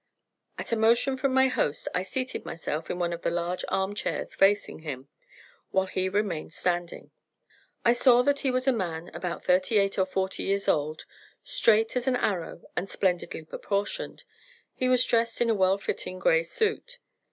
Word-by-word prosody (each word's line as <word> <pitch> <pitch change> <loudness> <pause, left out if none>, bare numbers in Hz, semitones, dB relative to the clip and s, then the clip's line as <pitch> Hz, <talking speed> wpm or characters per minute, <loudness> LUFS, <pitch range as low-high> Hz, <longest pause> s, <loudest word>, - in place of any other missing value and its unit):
At - - -3
a - - +3
motion 230 +4 +3
from 265 +1 0
my 265 0 +5
host 155 - -1
I 180 - +1
seated 255 +7 -4
myself 160 -1 -4
in - - -2
one 175 -1 -1
of 170 - -6
the - - 0
large 175 +1 -2
arm 190 +1 0
chairs 205 - -3
facing 205 +1 +2
him, 140 -4 -7 0.6
while 190 0 +2
he 185 0 -1
remained 190 -6 -2
standing. 175 -1 -2 0.7
I 235 - +6
saw 245 0 +5
that 285 +1 +2
he 270 - 0
was 255 +1 0
a 265 - +5
man 175 -6 -3
about 175 -2 -4
thirty 185 +4 +3
eight 195 -1 +2
or 190 - +2
forty 190 0 -2
years 200 0 -1
old, 155 +1 0 0.4
straight 225 +2 +2
as 250 +1 -1
an 260 - +3
arrow 185 -8 -2
and 195 - -2
splendidly 180 -4 -1
proportioned. 205 - -3 0.5
He 255 - 0
was 255 0 +4
dressed 230 0 +1
in 235 -1 +3
a - - +4
well 190 -1 +3
fitting 185 -2 -4
gray - - +3
suit. 485 0 -2
200 Hz, 180 wpm, -27 LUFS, 180-250 Hz, 0.7 s, I